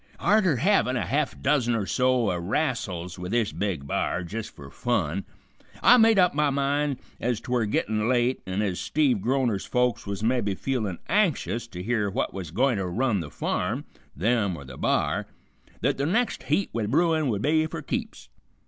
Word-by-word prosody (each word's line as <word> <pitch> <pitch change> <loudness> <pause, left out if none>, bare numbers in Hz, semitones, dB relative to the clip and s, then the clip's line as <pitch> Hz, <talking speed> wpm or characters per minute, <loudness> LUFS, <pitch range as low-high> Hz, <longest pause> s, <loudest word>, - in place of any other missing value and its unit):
"Arter 190 -4 +3
havin' 135 - +2
a - - -1
half 145 +1 -1
dozen 130 -4 +2
or 105 -3 -1
so 125 -1 +2
o' - - -1
rassels 90 - -2
with 90 +1 -5
this 115 -2 +1
big 95 -9 -3
b'ar, 85 +4 -1
jist 105 +5 -6
fer 70 -1 -11
fun, 95 -7 -1 0.6
I 245 - +8
made 225 -2 +5
up 180 -2 +4
my 150 0 +2
mind, 140 0 0 0.2
ez 120 -2 -1
'twere 120 -2 -1
gettin' 110 +1 0
late, 125 0 +1
an' 95 +3 -1
ez 90 -4 -2
Steve 135 - +1
Groner's 120 -5 0
folks 125 -3 0
was 100 +1 -4
mebby 115 -4 +1
feelin' 110 -7 -2
anxious 160 - +1
to 90 -5 -7
hear 105 -1 0
which 115 +8 -1
was 95 -5 -6
gointer 105 - +1
run 120 0 +1
the 80 -4 -5
farm, - - -2 0.3
them 100 - +1
or 70 - -10
the 65 0 -10
b'ar, - - 0 0.6
th't - - +2
the 140 +1 0
next 230 +8 0
heat 200 - +1
with 110 -3 -1
bruin 160 +2 +2
would 105 -3 -1
be 155 +1 +2
for 160 -1 -6
keeps. 65 - -5
120 Hz, 180 wpm, -26 LUFS, 100-140 Hz, 0.6 s, I